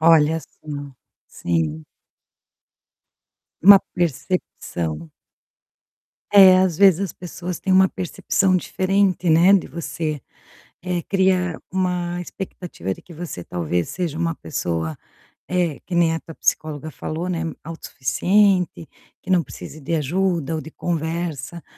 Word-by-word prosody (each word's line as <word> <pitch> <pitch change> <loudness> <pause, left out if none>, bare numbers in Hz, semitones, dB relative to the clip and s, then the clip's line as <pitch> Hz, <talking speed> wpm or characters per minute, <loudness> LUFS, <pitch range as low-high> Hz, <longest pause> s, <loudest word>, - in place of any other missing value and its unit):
Olha, 160 0 +5
sim. 145 -3 -9 0.3
Sim. 80 -2 -2 1.8
Uma 200 +1 +10 0.2
percepção. 85 - -3 1.2
É, 190 -2 +9
às 180 -4 +1
vezes 195 -3 +6
as 195 -4 -2
pessoas 180 0 -6
têm 190 - -1
uma 190 0 +6
percepção 185 +1 0
diferente, 185 0 +1
né, 170 +5 +6
de 195 - +3
você, 160 -3 -4 0.6
eh, 180 -2 -2
cria 185 -3 +1
uma 180 -1 -1
expectativa 175 - -6
de - - -17
que 175 - -14
você 155 - -7
talvez 85 0 -2
seja 175 -4 -3
uma 165 -1 -1
pessoa, 80 - -3 0.5
eh, 175 -5 0
que 180 - -5
nem 170 -1 +3
a 165 - -3
tua 165 - -11
psicóloga 155 0 -1
falou, 160 +4 -4
né, 170 -3 -2 0.2
auto 165 +1 -8
suficiente, 180 +5 +2 0.3
que - - -16
não 180 -2 +4
precise 155 - -10
de 160 +4 -2
ajuda 165 0 0
ou 155 - -2
de 160 - -10
conversa, 165 -1 -3
170 Hz, 125 wpm, -22 LUFS, 150-185 Hz, 1.8 s, Uma